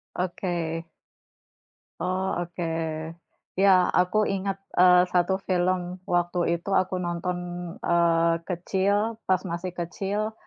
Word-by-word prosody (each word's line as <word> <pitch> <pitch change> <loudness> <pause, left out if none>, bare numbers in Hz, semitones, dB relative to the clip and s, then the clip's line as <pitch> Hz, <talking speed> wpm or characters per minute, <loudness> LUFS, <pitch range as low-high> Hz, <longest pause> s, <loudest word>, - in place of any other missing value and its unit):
Oke. 170 -2 -2 1.2
Oh, 185 +1 -1
oke. 175 0 -4 0.9
Ya, 190 -1 +5
aku 180 +4 +3
ingat, 195 0 -2 0.2
eee, 180 0 +6
1 180 +1 +3
film 180 0 0
waktu 175 -1 +1
itu 195 +4 -4
aku 185 -1 +2
nonton, 175 0 -2 0.5
eee, 170 -1 +3 0.2
kecil 200 +5 0
pas 185 - +5
masih 175 +1 -3
kecil, 200 +5 -2
180 Hz, 105 wpm, -26 LUFS, 175-190 Hz, 1.2 s, eee